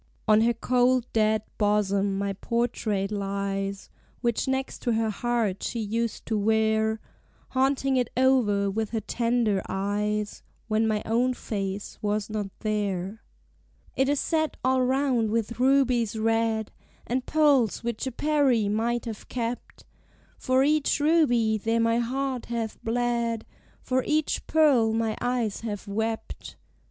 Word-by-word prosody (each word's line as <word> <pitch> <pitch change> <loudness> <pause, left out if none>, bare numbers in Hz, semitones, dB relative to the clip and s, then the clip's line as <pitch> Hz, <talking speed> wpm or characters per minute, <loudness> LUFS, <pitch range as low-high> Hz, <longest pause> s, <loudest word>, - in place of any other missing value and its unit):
"On 215 0 +5
her 235 +1 +3
cold 250 0 +2
dead 215 -1 +2 0.2
bosom 200 -2 +1
my 200 0 -1
portrait 215 -2 -1
lies, 195 -1 -3 0.3
Which 235 +1 0
next 265 0 -2
to 240 - 0
her 220 -1 +1
heart 225 -3 -1
she 235 - -3
used 225 +1 -2
to 220 -2 -1
wear 220 +1 +2 0.5
Haunting 265 0 +1
it 245 -2 +1
o'er 220 -7 +3
with 220 +1 -2
her 225 - -1
tender 230 -5 0
eyes 210 +2 -2 0.3
When 220 0 +1
my 215 -1 0
own 245 +3 +1
face 195 -3 -4
was 210 0 -1
not 210 -2 -2
there. 205 -1 -2 0.7
"It 265 +1 +2
is 290 -1 +1
set 315 -2 0
all 260 0 +3
round 255 -3 +1
with 230 +1 -2
rubies 250 -4 +2
red, 225 0 0 0.3
And 250 +1 -2
pearls 285 -9 +3
which 235 +2 -3
a - - -2
Peri, 270 -6 +2
might 230 +4 0
have 225 -3 -7
kept. 240 0 -5 0.5
For 260 +1 +2
each 300 0 +2
ruby 245 -9 +3
there 225 +2 0
my 230 +1 +2
heart 260 +1 -2
hath 230 -2 -4
bled: 235 -1 -1 0.4
For 255 0 0
each 305 0 0
pearl 270 -9 +4
my 225 -1 0
eyes 245 -4 -1
have 210 -2 -5
wept." 220 +2 -4
230 Hz, 140 wpm, -26 LUFS, 210-250 Hz, 0.7 s, On